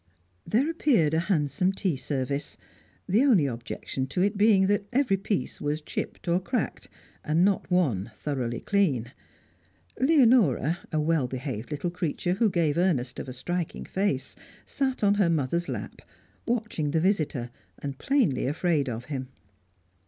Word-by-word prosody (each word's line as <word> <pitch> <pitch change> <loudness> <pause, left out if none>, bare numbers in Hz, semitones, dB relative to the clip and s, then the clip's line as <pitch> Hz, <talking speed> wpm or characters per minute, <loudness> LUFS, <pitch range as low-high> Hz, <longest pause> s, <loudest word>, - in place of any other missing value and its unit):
There 250 +7 +2
appeared 255 - +2
a 160 - +3
handsome 170 +1 +1
tea 190 -5 -1
service; 140 +1 -3 0.5
the 205 +6 +3
only 235 - +5
objection 130 +1 -4
to 180 +7 0
it 205 +2 +1
being 200 -2 +5
that 200 0 +1
every 255 -5 +2
piece 195 +1 -3
was 150 +1 -1
chipped 150 - -5
or 170 +1 +3
cracked, 240 +7 -3 0.3
and 160 +4 +3
not 200 -2 +1
one 135 - +1
thoroughly 120 -2 -3
clean. 145 - +1 0.9
Leonora, 230 - +4
a 155 - +1
well 155 -3 +1
behaved 130 -3 -5
little 150 +4 -3
creature 175 0 -1
who 215 +3 +2
gave 170 -3 +1
earnest 135 -9 0
of - - -6
a - - -6
striking 175 +6 -4
face, 165 -9 -1 0.3
sat 265 -4 -2
on 200 0 +5
her 175 - +4
mother's 165 +2 0
lap, - - -6 0.5
watching 220 -10 -1
the 160 - +1
visitor 155 - 0 0.3
and 140 -2 -6
plainly 250 - +1
afraid 150 -1 +1
of 120 +1 -5
him. 130 -3 -4
170 Hz, 150 wpm, -27 LUFS, 140-200 Hz, 0.9 s, only